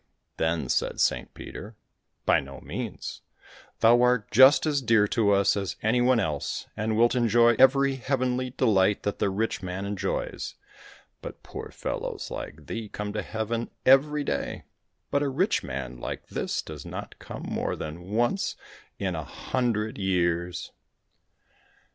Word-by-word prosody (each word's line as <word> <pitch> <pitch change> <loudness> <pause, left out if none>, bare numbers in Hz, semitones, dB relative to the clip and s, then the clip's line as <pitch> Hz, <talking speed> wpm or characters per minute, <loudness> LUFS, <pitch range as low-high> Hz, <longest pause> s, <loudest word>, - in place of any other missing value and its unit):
Then 80 -4 0
said - - 0
Saint - - +1
Peter, 105 +3 -9 0.5
"By - - +5
no 70 -1 -9
means, - - -6 0.6
thou 120 +2 +6
art 125 -3 +2
just 130 +8 +7
as 145 -3 +1
dear 110 -4 +4
to 110 -3 +2
us 100 -1 +4
as 100 -4 -2
any 115 +3 +3
one 125 -1 +4
else, 75 -9 -2
and 110 +1 -1
wilt 120 +1 +4
enjoy 120 -1 +4
every 135 0 +5
heavenly 130 -1 0
delight 105 -6 +2
that 100 - -2
the - - +2
rich 105 +3 -1
man 90 +1 -4
enjoys, 100 -1 -3 0.7
but - - -9
poor - - -7
fellows - - -4
like 75 0 -7
thee 110 +7 -5
come 105 0 -5
to 105 - -1
heaven 110 +3 -3 0.2
every 145 +3 +5
day, 70 - -3 0.5
but 140 - +2
a 145 - +1
rich 180 +11 +1
man 65 -2 -5
like - - -6
this - - -2
does 75 -3 -8
not - - -8
come - - -8
more - - -2
than 85 +4 -7
once 120 - 0 0.4
in 95 -2 -2
a 80 - -3
hundred 110 - -2
years!" 90 -2 0
110 Hz, 150 wpm, -27 LUFS, 95-125 Hz, 0.7 s, just